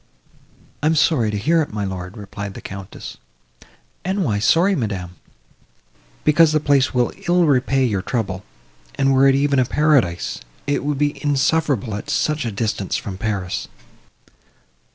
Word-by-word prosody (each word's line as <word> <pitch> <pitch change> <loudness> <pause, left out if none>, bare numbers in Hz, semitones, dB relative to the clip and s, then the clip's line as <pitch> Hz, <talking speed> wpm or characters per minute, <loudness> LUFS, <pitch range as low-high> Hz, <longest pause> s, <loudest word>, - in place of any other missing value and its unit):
"I 150 - +1
am 160 - +3
sorry 145 -7 +3
to 105 - -2
hear 160 +11 +2
it, 150 - -3
my 105 -1 -3
lord," 95 +1 -6
replied 100 -1 -7
the - - -7
Countess. 95 0 -8 0.9
"And 190 +2 0
why 105 -6 0
sorry, 170 - +3
madam?" 95 - -3 1.1
"Because 155 +1 +5
the 155 - +3
place 140 -2 +2
will 125 -1 +1
ill 175 0 +4
repay 135 -2 +2
your 100 -6 0
trouble; 100 -4 -3 0.5
and 135 0 +2
were 135 +1 +5
it 135 - +5
even 140 0 +2
a 130 - +3
paradise, 135 - +1 0.2
it 145 - 0
would 145 0 -1
be 145 +1 -1
insufferable 140 -5 +1
at 105 - -6
such 150 -3 0
a 115 - -2
distance 105 -2 -2
from 95 -2 -6
Paris." 100 -4 -2
130 Hz, 155 wpm, -21 LUFS, 100-150 Hz, 1.1 s, Because